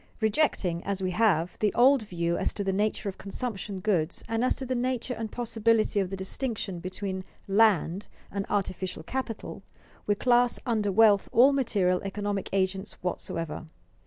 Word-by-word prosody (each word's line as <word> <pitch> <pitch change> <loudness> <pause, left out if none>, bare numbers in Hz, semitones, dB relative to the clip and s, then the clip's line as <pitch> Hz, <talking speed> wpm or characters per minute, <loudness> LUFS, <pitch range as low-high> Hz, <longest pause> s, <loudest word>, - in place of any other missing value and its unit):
Rejecting, 210 - +1
as 195 -1 -2
we 185 - 0
have, 180 -4 +1
the 210 -2 +2
old 265 +2 +6
view 170 -4 -2
as - - -1
to 205 - -2
the 195 -1 0
nature 210 +1 0
of 195 - -5
consumption 200 -2 -4
goods 180 -5 0
and 225 +1 0
as 255 - +2
to 265 - -5
the 255 - -1
nature 250 0 -1
and 225 -2 -5
possibility 225 -3 +1
of 190 -2 0
the 195 - -5
distinction 195 -1 -3
between 190 +1 -4 0.2
"land" 200 -3 +3 0.2
and 200 0 -3
artificial 185 -4 -2
capital, 250 +2 -5 0.5
we 205 - +3
class 245 +2 +3
under 215 -5 +1
wealth 205 -1 +5
all 265 +4 +6
material 200 -9 +1
economic 200 0 -3
agents 190 0 -1
whatsoever. 165 -3 -4
205 Hz, 160 wpm, -28 LUFS, 185-230 Hz, 0.5 s, old